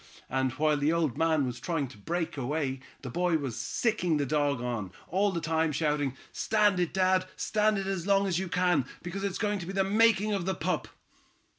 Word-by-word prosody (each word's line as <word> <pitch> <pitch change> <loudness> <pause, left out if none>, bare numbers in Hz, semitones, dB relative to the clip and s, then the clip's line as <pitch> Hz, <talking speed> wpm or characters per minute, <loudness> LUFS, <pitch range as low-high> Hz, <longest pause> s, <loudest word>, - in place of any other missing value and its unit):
And 130 -1 +1
while 150 +1 +2
the 145 +2 +2
old 165 -7 +1
man 160 -3 +2
was 125 -1 -4
trying 150 0 -1
to 125 - -13
break 165 - -2
away, 135 0 -2 0.2
the 130 - -5
boy 175 +2 +2
was 135 -6 -4
sicking 175 - 0
the 145 - 0
dog 145 -1 +1
on, 120 -6 -3 0.2
all 200 +2 +2
the 170 - -2
time 160 0 +1
shouting: 145 -3 0
'Stand 210 -3 +2
it, 175 -2 +1
dad, 185 0 +2
stand 215 0 +1
it 195 - -2
as 190 -2 -2
long 200 0 +4
as 185 -3 0
you 190 - -2
can, 175 -6 +2 0.2
because 185 +3 -5
it's 195 -2 -1
going 210 -2 0
to 175 - -7
be 195 - -4
the 195 0 +2
making 210 +1 +3
of 190 -3 -2
the 190 - 0
pup!'" - - -1
170 Hz, 210 wpm, -29 LUFS, 145-195 Hz, 0.2 s, long